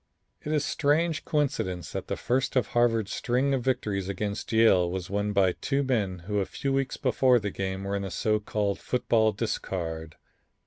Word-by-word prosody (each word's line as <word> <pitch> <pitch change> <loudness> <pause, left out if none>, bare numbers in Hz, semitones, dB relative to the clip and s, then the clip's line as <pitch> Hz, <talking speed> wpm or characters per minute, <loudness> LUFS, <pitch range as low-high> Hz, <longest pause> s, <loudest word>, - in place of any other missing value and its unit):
"It 150 - -4
is 150 -2 +1
a - - -3
strange 160 +2 +1
coincidence 130 - -1
that - - -5
the - - -2
first 130 +3 0
of 130 - +2
Harvard's 115 -4 +2
string 130 +3 +1
of 135 - +1
victories 105 -7 -1
against 100 +2 -3
Yale 110 -6 +5
was 95 +1 -5
won 100 +1 0
by 95 -2 +3
two 140 +9 -1
men 100 -9 -1
who 105 +1 0
a 95 - 0
few 135 -1 -2
weeks 135 0 -1
before 130 -1 +3
the 105 -3 -2
game 95 0 -3
were 100 +1 -2
in 100 - -1
the 95 - -4
so 105 +4 +1
called 105 -1 -1
football 115 -3 +2
discard." 85 -7 -4
105 Hz, 190 wpm, -27 LUFS, 95-130 Hz, -, Yale